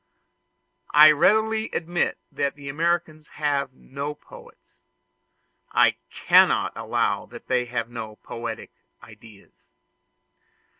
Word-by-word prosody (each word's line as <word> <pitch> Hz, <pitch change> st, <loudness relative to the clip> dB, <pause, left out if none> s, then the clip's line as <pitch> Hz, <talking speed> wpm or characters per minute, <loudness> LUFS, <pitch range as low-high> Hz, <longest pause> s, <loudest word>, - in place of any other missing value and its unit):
I 155 Hz, +1 st, +9 dB
readily 220 Hz, +8 st, +2 dB
admit 175 Hz, +1 st, -1 dB
that 140 Hz, -, -2 dB
the 140 Hz, -1 st, -9 dB
Americans 160 Hz, 0 st, -1 dB
have 145 Hz, -3 st, -1 dB
no 140 Hz, +3 st, -6 dB
poets; 150 Hz, -, -17 dB, 0.9 s
I -, -, +4 dB
cannot -, -, +3 dB
allow -, -, -1 dB
that -, -, -12 dB
they 125 Hz, -1 st, +1 dB
have 120 Hz, -1 st, -3 dB
no 110 Hz, -3 st, -8 dB
poetic 115 Hz, 0 st, -7 dB, 0.3 s
ideas. 110 Hz, -2 st, -17 dB
145 Hz, 100 wpm, -24 LUFS, 120-160 Hz, 0.9 s, I